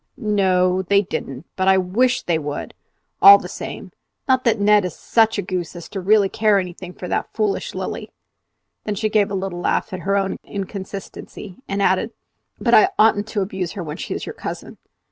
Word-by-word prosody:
"N 210 -4 -1
o, 185 -1 +2
they 200 +2 +2
didn't; 135 -5 -6
but 190 0 -1
I 190 0 +6
wish 215 +8 +1
they 165 -2 0
would, 145 -1 -5 0.5
all 200 0 +11
the - - -8
same. - - -7 0.4
Not 260 -1 +2
that 225 -2 +2
Ned 210 0 +4
is 180 - -4
such 225 -1 +2
a - - -1
goose 180 -2 -4
as 175 - -8
really 200 +2 +3
to - - -13
care 215 -2 +3
anything 180 -1 -5
for 180 - -8
that - - -2
foolish 210 -3 -1
Lilly!" - - -5 0.7
Then 210 - -3
she 215 +2 -1
gave 210 -2 +2
a 200 - -3
little 190 -2 -4
laugh 190 - -1
at 185 - -4
her 195 +2 -1
own 195 -1 -1
inconsistency, 195 -1 -7
and 200 0 -1
added, 195 +5 +1 0.5
"But - - +1
I 380 - +7
oughtn't 215 -1 +3
to 215 -2 -2
abuse 190 -2 -3
her 195 -4 -5
when 150 -2 -6
she - - -5
is - - -5
your - - -6
cousin." - - -7
195 Hz, 200 wpm, -21 LUFS, 185-210 Hz, 0.7 s, all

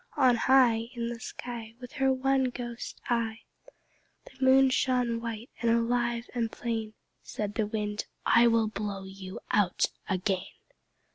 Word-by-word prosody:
On 255 -4 +5
high 235 -2 +4
In 235 -1 -2
the 240 -1 -5
sky 230 0 -7
With 250 0 -9
her 270 -2 +2
one 265 0 +2
clear 240 -1 -5 0.3
eye, 230 -2 -1 0.8
The 265 0 -8
Moon 265 0 +6
shone 245 -3 +1
white 230 +1 -6
and 235 - +2
alive 235 0 +1
and 230 -2 -1
plain. 225 -2 -3 0.3
Said 210 -1 -4
the 210 0 0
Wind 210 -1 -3 0.2
"I 235 +1 +6
will 230 -1 +3
blow 200 -2 -4
you 190 0 -8
out 200 -4 +2 0.2
again." 190 -1 0
235 Hz, 145 wpm, -29 LUFS, 215-245 Hz, 0.8 s, Moon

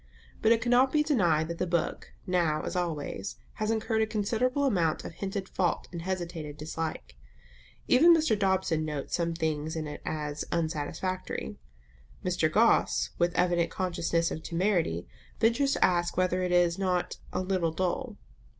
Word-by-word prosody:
But 220 - +4
it 225 -1 +3
cannot 250 +2 +4
be 300 -1 +3
denied 175 - +2
that 170 - -5
the 180 - 0
book, 170 -2 -2
now 170 -4 +1
as - - -4
always, 170 +1 -3 0.3
has 215 - +1
incurred 220 0 0
a 220 - +2
considerable 230 +6 0
amount 175 - +1
of - - -5
hinted 195 +3 -4
fault 175 -4 -1
and 170 -2 -5
hesitated 170 -5 -4
dislike. 155 - -5 0.7
Even 310 +7 +7
Mr. 315 -7 +2
Dobson 190 -5 +1
notes 150 -3 -4
some 170 -1 0
things 160 -1 -2
in 160 -1 -3
it 150 0 -7
as 150 -1 -3
"unsatisfactory;" 160 - -3 0.7
Mr. - - +1
Gosse, - - +3
with 175 0 +2
evident 175 -1 +2
consciousness 170 -2 0
of 160 - -4
temerity, 170 - 0 0.3
ventures 235 +5 +3
to - - +4
ask 175 -1 0
whether 185 0 +2
it 180 -1 -1
is 175 0 +3
not 180 -2 0
"a - - -1
little 185 -3 0
dull." 185 +7 -2
175 Hz, 160 wpm, -29 LUFS, 160-205 Hz, 0.7 s, Even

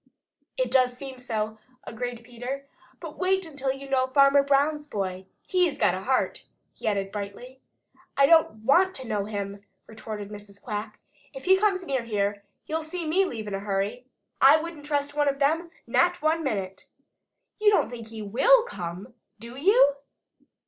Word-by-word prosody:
"It - - 0
does 250 -2 +3
seem 265 -1 -8
so," 220 -3 -3 0.2
agreed 240 0 -5
Peter. 245 +4 -6 0.3
"But - - -9
wait 380 0 +1
until 280 -4 -3
you 270 +1 -8
know 260 -1 +1
Farmer 275 +1 +5
Brown's 285 +2 +1
boy! 190 -6 -4 0.2
HE'S 360 -4 +1
got - - +3
a 185 - -4
heart!" 260 +4 0 0.3
he - - -7
added 195 -2 0
brightly. 210 +6 -7 0.6
"I 275 - +6
don't 275 -9 +3
want 370 +8 +4
to 260 -2 -6
know 210 -3 -1
him," 200 -1 -5 0.2
retorted 215 -2 -7
Mrs. 205 -1 -11
Quack. 210 +1 -5 0.4
"If - - -9
he 380 +1 +6
comes 385 -3 +1
near 270 -5 -1
here, 205 -3 -1 0.2
you'll 320 +1 -2
see 330 +2 -5
me 365 +5 +2
leave 225 - -5
in 205 - -5
a 195 - -2
hurry. 200 +5 -2 0.3
I 275 +3 +8
wouldn't 315 -2 -7
trust 290 -1 -1
one 290 -1 +3
of 275 - -2
them, 320 +5 +1 0.2
not 350 +9 +2
one 320 +2 +1
minute. 195 -8 -3 0.7
You 425 0 +5
don't 405 - +2
think 230 -2 -8
he 220 -1 -8
will 460 - +5
come, 185 - -7 0.2
do 235 +3 -10
you?" 285 - +4
260 Hz, 170 wpm, -26 LUFS, 210-310 Hz, 0.7 s, I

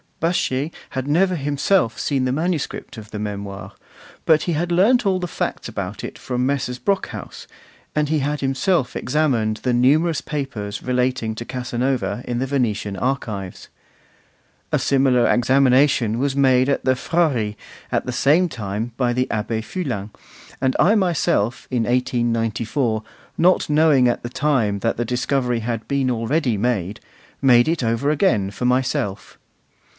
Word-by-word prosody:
Baschet 155 -3 0 0.2
had 130 0 -3
never 180 +5 +2
himself 145 - +1
seen 135 -3 0
the 125 - 0
manuscript 155 -4 -3
of 110 -1 -10
the 105 - -6
Memoirs, 100 -2 -5 0.5
but 155 -1 +4
he 175 - -1
had 170 +3 -1
learnt 210 +9 +4
all 190 -2 +1
the 180 - -3
facts - - -3
about 100 -3 -5
it - - -6
from 125 0 -2
Messrs. 130 -2 -1
Brockhaus, 200 -1 -3 0.5
and 150 -1 +1
he 155 0 +1
had 145 +2 -2
himself 135 +2 0
examined 125 -6 0
the 125 +2 -1
numerous 150 +6 +3
papers 120 -9 -4
relating 125 -3 0
to 120 - -6
Casanova 125 0 -2
in 120 - -2
the 130 - 0
Venetian 110 -7 -1
archives. 110 -8 -3 1.0
A - - +3
similar 130 -3 +3
examination 130 -2 +3
was 140 0 0
made 130 -2 +4
at 140 - 0
the 130 0 +3
Frari 130 -8 0 0.4
at - - +2
about - - -14
the - - -1
same 150 +9 +3
time 110 -1 -4
by 125 -2 +1
the 125 +1 0
Abbé 110 +1 -2
Fulin; 120 - -4 0.5
and 130 -1 +1
I 180 +7 +5
myself, 165 - +1
in 125 -3 +1
1894, 120 -1 0 0.4
not 180 -1 +3
knowing 150 -4 +4
at 120 - 0
the 120 - -5
time 120 -8 0
that 115 - -1
the 120 - -1
discovery 125 0 0
had 115 0 -4
been 140 -2 0
already 120 +1 0
made, 105 -3 -1 0.4
made 120 -3 +5
it 160 -4 0
over 115 +5 0
again 120 - +2
for 125 - -4
myself. 125 -6 -1
125 Hz, 155 wpm, -21 LUFS, 115-145 Hz, 1.0 s, I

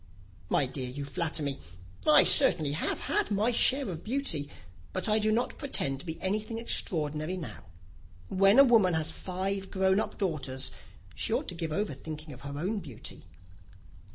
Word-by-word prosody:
"My 140 - +2
dear, 130 0 -5
you 140 +3 -6
flatter 155 +3 -1
me. 140 -1 -3 0.5
I 300 -1 +8
certainly 165 - +4
have 150 - -2
had 420 -1 0
my 210 +4 +2
share 265 +3 +3
of 170 -4 -6
beauty, 215 - -1 0.4
but 185 - -2
I 215 0 +3
do 215 0 +2
not 235 +3 -1
pretend 140 - -1
to 175 - -10
be 160 +1 -5
anything 215 +4 -2
extraordinary 155 -6 0
now. 160 - -8 0.6
When 195 - +4
a 275 - +10
woman 220 -9 +4
has 160 0 0
five 190 +3 -3
grown 190 0 +2
up - - -3
daughters, 150 -9 -1 0.4
she - - -2
ought - - 0
to - - -3
give 165 -2 -4
over 200 0 -1
thinking 155 +2 -8
of 130 - -12
her 140 0 -6
own 195 +8 -1
beauty." 135 - -7
180 Hz, 175 wpm, -29 LUFS, 150-215 Hz, 0.6 s, a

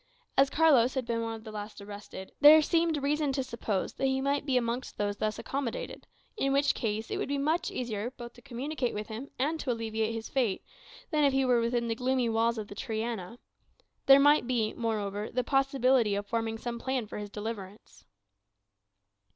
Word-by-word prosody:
As 270 0 +5
Carlos 280 -6 +4
had 260 -2 -1
been 230 -1 -1
one 225 0 -3
of 220 - -11
the 220 - -8
last 210 0 -7
arrested, 200 -2 -9
there 300 +2 +10
seemed 330 -1 +2
reason 295 0 +1
to 265 -1 0
suppose 225 -5 -3
that 270 - 0
he 265 0 +1
might 280 +2 0
be 260 -2 +3
amongst 240 +1 -2
those 205 0 -1
thus 215 0 -1
accommodated; 270 -4 -4 0.3
in 275 -11 0
which 280 +1 +3
case 220 0 -3
it - - -1
would - - -2
be 285 0 -1
much 315 +5 0
easier 230 -2 -3
both 240 -2 -10
to 240 - -16
communicate 260 +1 -3
with 210 0 -5
him, 230 +6 -6
and 305 +5 0
to 265 - -1
alleviate 225 -1 -2
his 225 0 -5
fate, 240 -8 0 0.5
than 305 -2 +2
if 280 -2 +4
he 270 0 +2
were 245 -2 +3
within 235 0 0
the 230 - 0
gloomy 250 0 0
walls 230 +1 +1
of 215 -2 -4
the - - -9
Triana; 220 -1 -4 0.7
there 275 0 +9
might 290 -2 +5
be, 230 -4 0
moreover, 210 -3 -2
the 250 +1 -1
possibility 265 -5 +2
of 205 0 -3
forming 225 +1 -2
some 235 +1 -5
plan 260 -1 -2
for 210 - -7
his 205 0 -6
deliverance. 205 -1 -8
235 Hz, 200 wpm, -29 LUFS, 220-270 Hz, 0.7 s, there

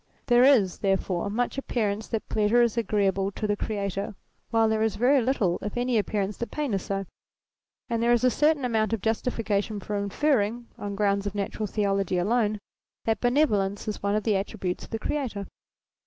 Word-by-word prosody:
There 245 0 +5
is, 235 -10 +4
therefore, 195 -1 0
much 245 +5 -1
appearance 215 -5 -2
that 225 -2 -3
pleasure 220 +3 +3
is 235 -2 +1
agreeable 195 -4 +1
to 215 - -3
the 205 -1 +1
Creator, 200 -1 -3 0.3
while 225 -1 +3
there 220 0 +1
is 220 -2 +1
very 255 +5 +4
little 225 -8 +1
if 210 +3 -5
any 245 -2 +2
appearance 205 -1 -2
that 235 - -4
pain 295 -6 -2
is 195 - 0
so: 195 +1 -3 0.8
and 230 -2 -1
there 235 +1 +3
is 240 0 +3
a 255 - +5
certain 295 +2 +2
amount 220 -3 +1
of 225 - -1
justification 220 -2 -1
for 205 +2 -4
inferring, 230 +2 0
on 205 -1 -5
grounds 200 0 +1
of 200 - -5
Natural 205 +1 -2
Theology 195 -2 0
alone, 215 +3 +1 0.5
that 225 -2 0
benevolence 215 -7 +1
is 210 - -3
one 200 +1 0
of 215 - 0
the 220 - +1
attri 200 +2 -2
butes 180 -1 -2
of - - -18
the 225 - -2
Creator. 225 -4 -3
215 Hz, 190 wpm, -26 LUFS, 200-235 Hz, 0.8 s, There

